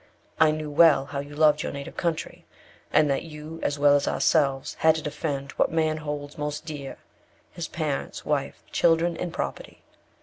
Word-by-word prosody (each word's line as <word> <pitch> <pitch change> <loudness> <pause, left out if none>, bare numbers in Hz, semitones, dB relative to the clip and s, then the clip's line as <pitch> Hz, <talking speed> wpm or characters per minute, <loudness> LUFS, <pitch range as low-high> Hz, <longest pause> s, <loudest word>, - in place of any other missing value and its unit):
I 160 -1 +6
knew 155 -1 -3
well 145 -3 +6
how 140 0 -5
you 145 +1 -7
loved 150 -1 +4
your - - -3
native 140 0 -7
country, 165 -2 -3 0.5
and 155 - +4
that 135 - 0
you, 155 0 -9
as 145 - -1
well 145 0 +5
as 140 - +1
ourselves, 135 -4 +1
had 160 0 +5
to 160 - -3
defend 140 -2 -3
what - - +3
man 155 -1 +1
holds 145 -1 -6
most 150 +1 -3
dear 145 -4 -6 0.5
his 170 -2 -5
parents, 155 -4 -3
wife, 140 -2 -2
children, 170 0 +3
and 175 +1 -4
property. - - -5
150 Hz, 175 wpm, -26 LUFS, 145-160 Hz, 0.5 s, I